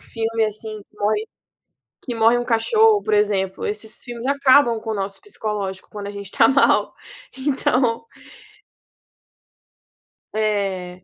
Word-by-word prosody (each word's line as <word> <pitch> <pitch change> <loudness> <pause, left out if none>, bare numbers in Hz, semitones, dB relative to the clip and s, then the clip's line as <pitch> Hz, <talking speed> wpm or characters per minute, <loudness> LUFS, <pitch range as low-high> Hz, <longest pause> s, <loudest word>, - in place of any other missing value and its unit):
filme, 225 0 -2
assim, 215 0 -6
que 210 - -28
morre 210 +1 0 0.8
que 245 - -4
morre 225 +2 +4
um 240 - -2
cachorro, 425 - +3
por 215 - -3
exemplo, 195 -2 0
esses 215 +1 -4
filmes 240 -1 -8
acabam 275 -4 +4
com 225 0 -6
o - - -1
nosso 195 -1 -4
psicológico 210 - -5
quando 205 -1 -7
a - - -4
gente 200 -1 -8
tá 225 - +4
mal, 275 +1 +3 0.4
então 260 - 0 2.3
É. 195 -4 -2
220 Hz, 130 wpm, -21 LUFS, 205-240 Hz, 2.3 s, morre